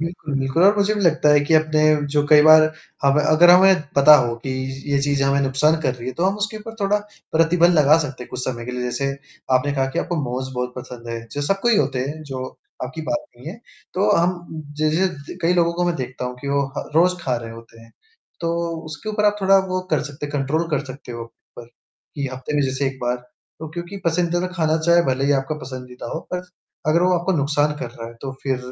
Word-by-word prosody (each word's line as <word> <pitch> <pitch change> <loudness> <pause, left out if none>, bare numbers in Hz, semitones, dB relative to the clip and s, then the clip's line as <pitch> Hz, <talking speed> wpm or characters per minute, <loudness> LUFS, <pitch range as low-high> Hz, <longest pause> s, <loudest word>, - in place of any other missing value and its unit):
बिल्कुल, 165 -3 -4
बिल्कुल, 135 +5 0
और 205 +2 +5
मुझे 205 +1 +2
भी 210 - -2
लगता 160 -5 +3
है 145 - +6
कि 160 - +2
अपने 155 0 +3 0.3
जो 145 -1 +3
कई 150 0 +7
बार 155 0 +8 0.4
हमें 140 +2 +3
अगर 155 +4 +6
हमें 185 0 +6 0.2
पता 145 +2 +8
हो, 120 -4 0
कि 125 +3 -6
य 135 +2 -4
ये 140 - +3
चीज़ 140 -1 +1
हमें 140 +1 +2
नुकसान 140 +4 +2
कर 130 -4 0
रही 120 -1 -9
है, - - -3
तो 170 - -1
हम 195 +2 +1
उसके 215 +2 -3
ऊपर 225 +1 -9
थोड़ा 200 +1 +2 0.3
प्रतिबंध 170 +2 +4
लगा 150 +1 +6
सकते 140 -5 -4
हैं - - -11
कुछ 125 - -5
समय 120 -2 -4
के 125 - -5
लिए। 125 0 -4
जैसे, 125 +3 -3 0.5
आपने 130 +3 +2
कहा 135 -1 0
कि - - -1
आपको 175 - -2
मोमोज 130 -2 -3
बहुत 125 0 -3
पसंद 125 -2 -9
है, 115 0 -3
जो 145 - -3
सबको 195 +9 0
ही 230 - +4
होते 135 -5 +1
हैं, 145 +5 -4
जो 135 -3 -6 0.4
आपकी 135 +6 -7
बात 300 0 -1
नहीं 125 +5 -9
है, 195 +7 -8 0.4
तो 200 +3 +2
हम 170 -2 -2 0.2
ज 155 - +3
ज 190 +3 +2 0.2
द - - -9
कई 165 +2 +3
लोगों 170 -1 +2
का 175 +1 0
मैं 175 - 0
देखता 125 -1 -5
हूँ 125 0 -4
कि 140 - -5
वो 140 0 +1 0.2
ह - - -6
रोज़ 180 +3 +4
खा 125 -2 0
रहे 115 -1 -7
होते 115 0 -13
हैं। 115 - -17 0.5
तो 165 - -1 0.4
उसके 155 +7 -8
ऊपर 210 0 -1
आप 210 0 +3
थोड़ा 195 0 +5
वो 185 0 -1
कर 155 - +2
सकते 145 0 -7
हैं, 145 - -10
कंट्रोल 150 +4 -1
कर 150 -1 0
सकते 130 -2 -9
हो, 115 0 -6 0.3
पर 120 - -9 0.5
कि 140 -2 -3
हफ़्ते 130 +3 -5
में 145 - +2
जैसे 135 +1 -1
1 135 0 -4
बार, 120 0 0 0.4
तो 160 0 -7
क्योंकि 175 +4 -7
पसंदीदा 175 +1 0
खाना 160 -3 +1
चाहे 170 +2 +4
भले 130 +1 0
ही 145 - +3
आपका 135 +3 -4
पसंदीदा 125 -1 -8
हो, 160 - -3
पर 180 0 -3 0.4
अगर 160 +3 +3
वो 185 0 +3
आपको 180 +2 0
नुकसान 145 +1 +1
कर - - -5
रहा 115 - -9
है, 115 - -13
तो 135 - -4
फिर 135 -2 -1
150 Hz, 245 wpm, -21 LUFS, 130-170 Hz, 0.5 s, बार